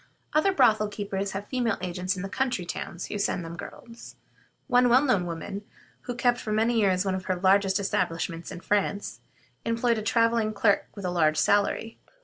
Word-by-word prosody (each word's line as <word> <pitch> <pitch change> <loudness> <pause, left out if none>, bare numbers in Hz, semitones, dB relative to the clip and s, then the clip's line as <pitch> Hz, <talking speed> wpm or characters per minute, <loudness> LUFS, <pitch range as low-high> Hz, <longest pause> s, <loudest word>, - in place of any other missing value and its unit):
Other 310 +6 +3
brothel 220 - +4
keepers 200 -1 -4
have 200 +1 -5
female 245 -4 0
agents 180 +1 -2
in 180 - -5
the - - -3
country 245 -4 -1
towns, 175 0 -5
who 205 - -5
send 185 -4 -1
them 165 +1 -7
girls. 230 +6 -11 0.5
One 245 0 +4
well 255 +4 +5
known 205 -11 +1
woman, 185 +4 -5 0.4
who 245 - -3
kept 245 0 +2
for 215 - -5
many 225 +2 +2
years 190 -2 +2
one 190 - 0
of 185 0 -3
the 185 - +1
largest 190 +1 +3
establishments 165 -3 -2
in 175 - -8
France, 200 - -1 0.4
employed 230 0 +1
a - - -4
traveling 230 -1 +2
clerk 205 -1 +2
with 200 -3 -7
a 180 - -1
large 155 -3 +2
salary. 205 +5 +1
205 Hz, 185 wpm, -27 LUFS, 185-230 Hz, 0.5 s, well